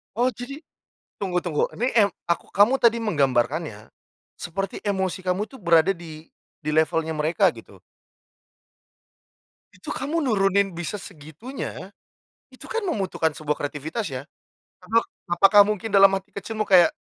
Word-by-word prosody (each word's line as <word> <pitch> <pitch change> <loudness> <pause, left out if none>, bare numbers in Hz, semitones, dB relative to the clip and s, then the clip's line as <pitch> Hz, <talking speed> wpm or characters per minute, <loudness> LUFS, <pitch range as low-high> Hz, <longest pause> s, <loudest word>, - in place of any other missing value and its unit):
Oh 245 +2 +2
jadi, 275 +6 -9 0.6
tunggu-tunggu 180 -5 -1
ini 245 +4 0
eng 205 -3 +5 0.2
aku 170 - -2
kamu 205 +6 +4
tadi 235 0 +5
menggambarkannya, 140 - 0 0.5
seperti 195 +3 -5
emosi 190 -2 -2
kamu 185 +3 -1
tuh 265 -1 -15
berada 170 +2 +4
di 160 -2 -11 0.3
di 155 -1 -4
levelnya 160 +1 +1
mereka 155 +2 +2
gitu. - - -14 2.0
Itu - - -11
kamu 325 +4 -2
nurunin 200 - +2
bisa 175 +4 -4
segitunya, 170 - -8 0.6
itu - - -13
kan 460 0 -3
membutuhkan 195 - -1
sebuah 150 -1 -1
kreativitas 150 - -4
ya, 130 -1 -5 0.6
apa 220 +5 +2 0.3
apakah 195 +4 +7
mungkin 210 0 -3
dalam 195 0 +8
hati 195 +1 -22
kecilmu 215 +1 -4
kayak, 185 - +6
190 Hz, 130 wpm, -24 LUFS, 160-215 Hz, 2.0 s, dalam